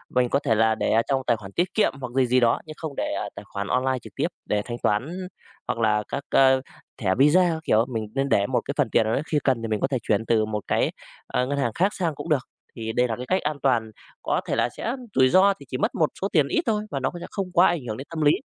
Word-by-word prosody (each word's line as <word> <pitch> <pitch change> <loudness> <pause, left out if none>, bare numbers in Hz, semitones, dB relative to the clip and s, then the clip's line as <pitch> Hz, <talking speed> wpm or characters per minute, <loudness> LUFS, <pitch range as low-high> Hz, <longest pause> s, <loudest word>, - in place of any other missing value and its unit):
Mình 125 -1 +3
có 140 - +2
thể 115 -6 +1
là 110 0 +3
để - - -1
ở 115 - +4
trong 135 -1 +2
tài 120 - +3
khoản 100 -2 -10
tiết 180 - -1
kiệm 215 - +2
hoặc 125 -2 -5
gì 135 -1 +4
gì 125 +1 +4
đó, 120 -2 +3
nhưng 155 - -8
không 155 -4 -6
để - - -2
ở - - -3
tài - - -8
khoản 100 0 -5
online 130 0 +1
trực - - -13
tiếp - - 0 0.2
để 105 -1 0
thanh 120 -1 -5
toán, 160 - -1 0.4
hoặc 115 - -2
là 105 -2 +2
các, 140 - -4
a, 135 -1 +5 0.4
thẻ 95 -3 0
Visa 150 +7 +5
các 160 - -4
kiểu. 110 -6 +3
Mình 110 -3 -3
nên 135 0 0
để 100 -6 +3
một - - 0
cái - - -3
phần - - +2
tiền - - +3
nào 110 - 0
đấy 140 - 0
khi 150 - +3
cần 130 -4 +1
thì 115 - -3
mình 110 -1 -1
có - - +2
thể 135 - -1
chuyển 105 +1 +1
từ 110 -1 +2
một 105 -1 -3
cái, - - +1 0.4
a, 125 - 0
ngân 140 +2 -2
hàng 120 -5 0
khác 195 +4 +2
sang 170 -5 -2
cũng 165 - -7
được, 145 -4 +2 0.3
thì 110 -1 -4
đây 125 +1 +2
là 115 - -2
cái 125 - -7
cách 185 +1 +1
an 150 0 -2
toàn. 115 -5 +2 0.3
Có - - 0
thể - - 0
là - - +1
sẽ 235 - -2 0.2
rủi 130 -1 +5
ro 195 +6 +5
thì 140 - -12
chỉ 130 - -3
mất - - -1
một 155 - +2
số 195 - +1
tiền 150 -6 +4
ít 330 - +1
thôi 210 -2 0
và 140 - -2
nó 130 - 0
sẽ - - -7
không 195 -2 -3
quá 175 +2 +6
ảnh 170 -3 0
hưởng 110 - -4
đến 135 - -8
tâm 165 -1 -4
lý. 145 -1 +6
130 Hz, 300 wpm, -24 LUFS, 115-155 Hz, 0.4 s, quá